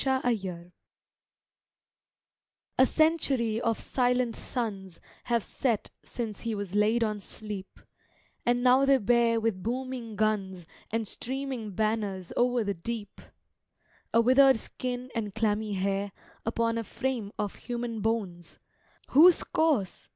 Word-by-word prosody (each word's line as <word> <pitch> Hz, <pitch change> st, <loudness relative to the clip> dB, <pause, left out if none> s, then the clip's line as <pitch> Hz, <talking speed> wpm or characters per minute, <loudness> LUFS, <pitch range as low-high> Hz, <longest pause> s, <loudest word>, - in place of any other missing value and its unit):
Paul 265 Hz, -1 st, +1 dB
Jones 180 Hz, -4 st, -6 dB, 2.1 s
A 260 Hz, -, +7 dB
century 270 Hz, -8 st, +2 dB
of 230 Hz, -2 st, 0 dB
silent 250 Hz, -2 st, +1 dB
suns 195 Hz, -8 st, -4 dB, 0.3 s
Have 235 Hz, -3 st, +1 dB
set 235 Hz, -6 st, -1 dB
since 220 Hz, -4 st, -5 dB
he 230 Hz, -2 st, -2 dB
was 200 Hz, -2 st, -5 dB
laid 215 Hz, +3 st, +3 dB
on 210 Hz, -2 st, -2 dB
sleep, 205 Hz, -1 st, -7 dB, 0.6 s
And 245 Hz, 0 st, +1 dB
now 255 Hz, +2 st, +5 dB
they 275 Hz, 0 st, +5 dB
bear 235 Hz, 0 st, +3 dB
with 220 Hz, -4 st, -1 dB
booming 245 Hz, 0 st, -4 dB
guns 200 Hz, -4 st, -1 dB, 0.2 s
And 225 Hz, -1 st, -2 dB
streaming 260 Hz, -4 st, -4 dB
banners 210 Hz, -4 st, -1 dB
o'er 245 Hz, -1 st, +2 dB
the 200 Hz, -1 st, -1 dB
deep 205 Hz, +4 st, -6 dB, 0.9 s
A 230 Hz, -, +5 dB
withered 260 Hz, +1 st, +6 dB
skin 250 Hz, +2 st, -5 dB
and 220 Hz, -4 st, -3 dB
clammy 215 Hz, -1 st, 0 dB
hair 195 Hz, +1 st, -1 dB, 0.3 s
Upon 230 Hz, 0 st, 0 dB
a -, -, -2 dB
frame 240 Hz, -3 st, -3 dB
of 205 Hz, -2 st, -2 dB
human 240 Hz, -2 st, -4 dB
bones: 200 Hz, -6 st, -2 dB, 0.5 s
Whose 335 Hz, +5 st, +7 dB
corse? 275 Hz, -, 0 dB
225 Hz, 125 wpm, -28 LUFS, 205-250 Hz, 2.1 s, A